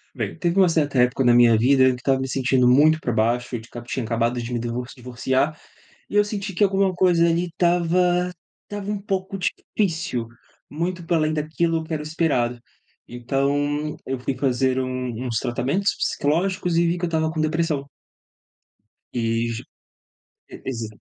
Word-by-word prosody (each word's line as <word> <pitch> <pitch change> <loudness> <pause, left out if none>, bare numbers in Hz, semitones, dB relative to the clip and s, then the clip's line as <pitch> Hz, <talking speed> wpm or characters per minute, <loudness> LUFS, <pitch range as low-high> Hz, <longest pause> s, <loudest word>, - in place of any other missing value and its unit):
Bem, - - -3
teve 175 +2 0
um 185 - +6
certa 145 -5 +1
época 125 +2 +3
na 120 - +6
minha 120 -2 +6
vida 130 +3 +4
em - - +6
que - - +1
eu - - -4
estava 135 +1 +1
me 130 - -3
sentindo 130 -1 +2
muito 150 +5 +5
pra 120 - -2
baixo 120 +3 0
e 115 - -2
de 115 - -15
cab 120 0 -9
tinha 125 -1 -3
acabado 115 +2 0
de 120 +1 -6
me 120 - 0
divor 120 +1 -3
divorciar 130 +4 -1 0.5
e - - -6
eu 205 - +6
senti 205 -2 -4
que 190 - +2
alguma 195 -1 +2
coisa 175 -2 +3
ali 170 +2 +1
estava 175 +1 +2 0.3
estava 205 -1 -6
um 205 -1 -2
pouco 195 -1 -3
difícil, 170 - -2 0.4
muito 175 +3 -3
para 170 0 +2
além 155 0 +1
daquilo 160 +2 0
que 160 - -6
era 150 - -2
o - - -8
esperado, 145 -7 0 0.5
então, 145 +4 -1
eu 130 0 -2
fui 130 +1 -3
fazer 130 -1 +1
um 130 -1 -3
uns 115 -2 -1
tratamentos 140 +12 0
psicológicos 175 +3 0
e 170 0 +3
vi 170 +1 0
que 175 - -8
eu - - +2
estava 160 -1 0
com 160 0 -2
depressão 155 -2 0 1.3
e 120 - -1 0.3
ju 115 - -6 0.9
e - - -9
exa 115 -4 -4
150 Hz, 185 wpm, -23 LUFS, 125-175 Hz, 1.3 s, um